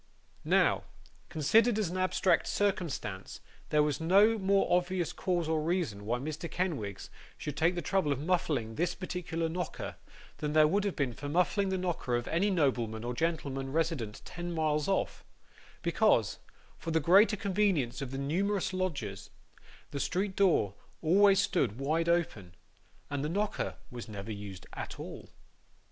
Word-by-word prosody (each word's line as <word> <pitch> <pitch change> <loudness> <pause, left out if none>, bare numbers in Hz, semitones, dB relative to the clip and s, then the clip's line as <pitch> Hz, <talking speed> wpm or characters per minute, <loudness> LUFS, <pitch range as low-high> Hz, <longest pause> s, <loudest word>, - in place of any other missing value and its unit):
Now, - - +3 0.4
considered 220 - +3
as 205 -6 0
an 185 - -3
abstract 185 -1 +2
circumstance, 155 - -2 0.3
there 150 -1 +4
was 150 +1 -1
no 200 +7 +5
more 195 0 +3
obvious 180 -1 0
cause 175 -3 -1
or 160 -1 +1
reason 155 - -1
why 120 +2 +1
Mr. 155 +5 -5
Kenwigs 145 - -3 0.3
should 150 -2 -5
take 165 +4 +2
the 175 - -3
trouble 190 -3 +1
of 140 - +1
muffling 150 -8 0
this 175 +8 -1
particular 175 -3 -3
knocker, 175 +2 -4 0.4
than 150 -1 -2
there 155 0 +6
would 200 +5 +1
have 200 - -1
been 135 -4 -1
for 145 - -7
his 145 - -4
muffling 190 +3 +2
the 190 - 0
knocker 175 -9 -1
of 120 0 -2
any 185 +5 +2
nobleman 125 - 0
or 120 +1 -2
gentleman 135 -3 -2
resident 150 -9 -1
ten 175 0 -5
miles 155 -2 0
off; 195 - -1 0.6
because, - - +2 0.4
for 165 - -5
the 160 0 +2
greater 195 +8 +5
convenience 190 - +1
of 135 - -4
the 135 - -5
numerous 185 +8 0
lodgers, 140 - -3 0.6
the 140 - -3
street 190 +5 -1
door 170 - +3 0.3
always 195 +4 +5
stood 105 - +1
wide 160 +5 0
open, 110 - 0 0.6
and 145 -1 -2
the 150 - -1
knocker 205 +5 -1 0.2
was 120 -2 -7
never 105 +1 -6
used 100 -3 -7
at - - -6
all. - - -8
165 Hz, 160 wpm, -31 LUFS, 135-185 Hz, 0.6 s, there